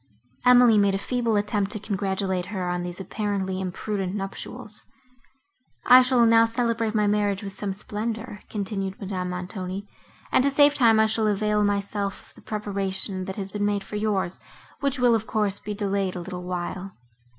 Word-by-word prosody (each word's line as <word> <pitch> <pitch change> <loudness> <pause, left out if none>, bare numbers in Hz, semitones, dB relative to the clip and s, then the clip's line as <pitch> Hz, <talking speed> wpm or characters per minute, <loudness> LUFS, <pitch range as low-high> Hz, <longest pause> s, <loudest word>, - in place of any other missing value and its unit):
Emily 245 -3 +7
made 200 -1 +3
a - - +1
feeble 235 +1 0
attempt 205 -1 0
to 215 - -4
congratulate 190 -2 -2
her 190 -3 -3
on 175 0 -1
these 175 0 -6
apparently 190 -1 -2
imprudent 190 +1 -3
nuptials. 210 +3 -6 1.0
"I 255 +1 +9
shall 250 -2 +4
now 230 0 +6
celebrate 230 -1 0
my 210 -1 +3
marriage 205 -1 +1
with 195 -1 -6
some 200 0 -3
splendour," 215 +2 -4
continued 195 0 -3
Madame 185 -3 -3
Montoni, 185 +2 -5 0.4
"and - - +4
to 280 - +3
save 285 +1 +5
time 230 -6 +5
I 220 - +6
shall 220 0 +1
avail 210 0 +1
myself 200 -1 -2
of - - -24
the - - -17
preparation 195 -2 -2
that 190 - -5
has 195 -2 -4
been 205 -1 -2
made 205 -1 0
for 200 - -8
yours, 205 -4 0 0.4
which 280 0 0
will, 245 -2 +4
of 220 -1 0
course, 210 -3 0
be 210 0 -5
delayed 200 -2 -1
a - - -3
little 180 0 -6
while. 180 +1 -4
205 Hz, 175 wpm, -25 LUFS, 190-220 Hz, 1.0 s, I